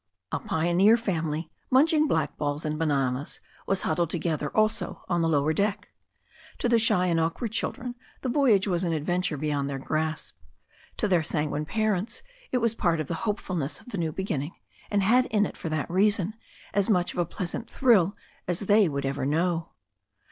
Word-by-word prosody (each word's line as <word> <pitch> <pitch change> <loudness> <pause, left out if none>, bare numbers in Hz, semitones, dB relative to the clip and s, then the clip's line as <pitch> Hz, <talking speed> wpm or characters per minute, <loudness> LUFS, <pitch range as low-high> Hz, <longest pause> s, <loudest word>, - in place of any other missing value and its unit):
A - - -1
pioneer 175 +7 +3
family, 165 -7 -2 0.2
munching 305 +3 +4
blackballs 150 - -1
and 155 0 -2
bananas, 140 -3 0 0.3
was 195 - +1
huddled 165 0 +1
together, 160 -3 -1
also 215 -3 +1
on 175 -2 +1
the 165 - +2
lower 150 0 +2
deck. 200 +4 -1 0.7
To - - 0
the 235 -1 +4
shy 185 -5 +3
and 170 -2 +2
awkward 165 +8 -1
children 240 +2 -3 0.3
the - - -3
voyage 240 -7 +3
was 180 -2 0
an 170 -2 0
adventure 170 +1 -1
beyond 145 -1 -1
their 140 - -3
grasp. 155 +3 -2 0.6
To 215 - +1
their 180 -4 +3
sanguine 150 -1 -2
parents 215 +1 -1 0.3
it - - +2
was 230 -2 +2
part 170 -7 +1
of 155 - -3
the - - -1 0.2
hope 210 - 0
fulness 165 -6 -3
of - - -15
the 200 - -4
new 165 -2 0
beginning, 155 -4 -3 0.3
and 205 -1 +1
had 250 +5 +4
in 210 -1 +2
it, - - -6
for 165 - -5
that 155 -1 -1
reason, 200 +2 +2 0.4
as 200 0 +1
much 180 -4 +2
of - - -4
a 175 - +2
pleasant 185 +6 -5
thrill 205 -7 +4 0.3
as 175 -1 -1
they 205 -2 +4
would 140 -1 -2
ever 135 0 -1
know. 165 +2 0
175 Hz, 185 wpm, -27 LUFS, 155-210 Hz, 0.7 s, munching